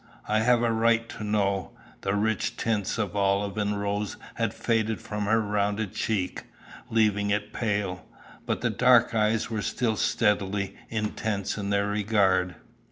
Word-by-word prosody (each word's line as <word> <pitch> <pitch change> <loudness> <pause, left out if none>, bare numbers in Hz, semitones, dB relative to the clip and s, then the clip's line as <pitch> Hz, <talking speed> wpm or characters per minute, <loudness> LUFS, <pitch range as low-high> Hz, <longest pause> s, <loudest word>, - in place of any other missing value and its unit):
I 110 0 +2
have 120 +1 +3
a 115 - +2
right 115 0 +2
to - - -7
know." 100 -2 0 0.3
The 95 +1 0
rich 105 0 0
tints 110 -3 -1
of 105 -3 -2
olive 100 0 +1
and 105 0 0
rose 100 0 -2 0.2
had - - -1
faded 110 -1 0
from 105 -2 -4
her 110 +2 +3
rounded 105 -1 -1
cheek, 100 -5 -2 0.4
leaving 105 -3 +2
it 105 +1 -1
pale. 100 -5 -2 0.4
But - - -1
the - - +1
dark 120 -2 +5
eyes 110 +1 +1
were 110 -1 -1
still 115 +1 0
steadily 100 -1 +1
intense 105 -2 -2
in 100 -1 -3
their 100 0 +2
regard. 100 -3 +2
105 Hz, 155 wpm, -27 LUFS, 100-110 Hz, 0.4 s, dark